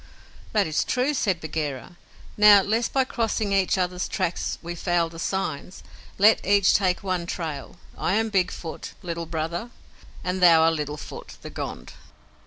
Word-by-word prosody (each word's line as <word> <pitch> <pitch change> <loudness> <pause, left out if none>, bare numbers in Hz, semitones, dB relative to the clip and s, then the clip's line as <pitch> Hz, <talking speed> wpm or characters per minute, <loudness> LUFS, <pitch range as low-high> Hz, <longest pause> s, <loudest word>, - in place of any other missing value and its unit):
"That 210 -2 +2
is 155 -2 0
true," 255 +4 0
said 195 - 0
Bagheera. 155 0 -4 0.4
"Now, 210 -1 +7
lest 225 +4 0
by 270 - +3
crossing 225 -4 -1
each 195 -1 +2
other's 180 0 -1
tracks 170 - -2
we 170 +1 -4
foul 175 -1 0
the 165 0 -11
signs, 180 -2 -3 0.3
let 215 +3 +5
each 200 0 +4
take 185 -2 +1
one 185 -3 -2
trail. 160 -3 -5 0.2
I 190 - 0
am 225 +1 +1
Big 190 -4 +2
Foot, 165 -2 -7
Little 170 -1 -4
Brother, 165 +7 -3 0.5
and 180 +1 -2
thou 170 -2 +7
art 165 0 +4
Little 150 -1 -3
Foot, - - -10
the - - -8
Gond." - - -6
180 Hz, 165 wpm, -25 LUFS, 165-200 Hz, 0.5 s, Now